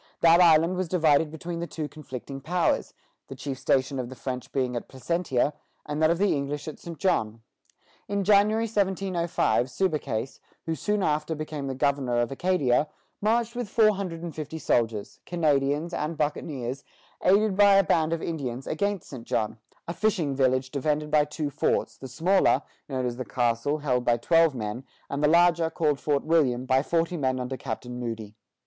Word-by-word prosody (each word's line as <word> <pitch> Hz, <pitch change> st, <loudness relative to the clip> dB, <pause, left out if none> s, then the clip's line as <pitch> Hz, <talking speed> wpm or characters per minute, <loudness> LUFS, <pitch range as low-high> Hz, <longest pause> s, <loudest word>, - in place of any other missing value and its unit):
That 170 Hz, +1 st, +6 dB
island 165 Hz, +1 st, +5 dB
was 185 Hz, -1 st, -1 dB
divided 160 Hz, -3 st, +3 dB
between 170 Hz, +2 st, -6 dB
the 170 Hz, -, -3 dB
two 155 Hz, -3 st, -5 dB
conflicting 135 Hz, -3 st, -8 dB
powers, 175 Hz, +4 st, 0 dB, 0.3 s
the 135 Hz, -, -8 dB
chief 130 Hz, 0 st, -5 dB
station 135 Hz, 0 st, +1 dB
of 125 Hz, -1 st, -4 dB
the 130 Hz, -, -9 dB
French 125 Hz, -1 st, -5 dB
being 130 Hz, -2 st, -1 dB
at 120 Hz, -, -4 dB
Placentia, 140 Hz, 0 st, -1 dB, 0.3 s
and 150 Hz, +1 st, -3 dB
that 155 Hz, -, +5 dB
of 170 Hz, -, +2 dB
the 200 Hz, -1 st, +2 dB
English 145 Hz, +1 st, -3 dB
at 155 Hz, -, -7 dB
St. 170 Hz, -2 st, -8 dB
John. 115 Hz, -, 0 dB, 0.6 s
In 200 Hz, -1 st, -1 dB
January, 210 Hz, +3 st, +4 dB
1705, 190 Hz, -, 0 dB
Subercase, 135 Hz, -, -2 dB, 0.3 s
who 165 Hz, -, -1 dB
soon 205 Hz, +6 st, -1 dB
after 155 Hz, +1 st, 0 dB
became 155 Hz, -2 st, -5 dB
governor 135 Hz, -3 st, +1 dB
of 120 Hz, +2 st, 0 dB
Acadia, 150 Hz, -3 st, +1 dB, 0.3 s
marched 230 Hz, +2 st, +1 dB
with 245 Hz, -4 st, -4 dB
four 215 Hz, 0 st, +4 dB
hundred 175 Hz, -4 st, -5 dB
and 170 Hz, -2 st, -5 dB
fifty 155 Hz, +1 st, -6 dB
soldiers, 115 Hz, -8 st, -1 dB
Canadians, 150 Hz, -1 st, +1 dB
and 155 Hz, +2 st, -3 dB
buccaneers, 140 Hz, -3 st, -3 dB, 0.4 s
aided 200 Hz, +2 st, +4 dB
by 200 Hz, 0 st, +6 dB
a 195 Hz, -, +6 dB
band 160 Hz, -2 st, +1 dB
of 165 Hz, -1 st, -2 dB
Indians, 135 Hz, -6 st, -4 dB
against 200 Hz, +2 st, -2 dB
St. 130 Hz, -5 st, -8 dB
John, 110 Hz, 0 st, -1 dB, 0.3 s
a 170 Hz, -, -3 dB
fishing 175 Hz, -10 st, 0 dB
village 130 Hz, -1 st, +1 dB
defended 150 Hz, +2 st, -1 dB
by 150 Hz, -1 st, +4 dB
two 150 Hz, 0 st, -4 dB
forts, -, -, 0 dB
the 135 Hz, -, -9 dB
smaller, 170 Hz, +9 st, +2 dB, 0.3 s
known 130 Hz, -2 st, -2 dB
as 120 Hz, -1 st, -3 dB
the 130 Hz, -, -3 dB
castle, 120 Hz, +4 st, 0 dB
held 130 Hz, -5 st, 0 dB
by 120 Hz, -1 st, +2 dB
twelve 165 Hz, +4 st, +3 dB
men, 110 Hz, +2 st, -4 dB, 0.3 s
and 140 Hz, +1 st, -2 dB
the -, -, +6 dB
larger, 170 Hz, 0 st, +4 dB
called 150 Hz, -3 st, 0 dB
Fort 145 Hz, -2 st, 0 dB
William, 135 Hz, -6 st, +2 dB
by 130 Hz, 0 st, +3 dB
forty 165 Hz, +3 st, 0 dB
men 130 Hz, -3 st, 0 dB
under 125 Hz, +1 st, -3 dB
Captain 125 Hz, -1 st, -6 dB
Moody. 115 Hz, -3 st, -5 dB
150 Hz, 180 wpm, -26 LUFS, 130-170 Hz, 0.6 s, That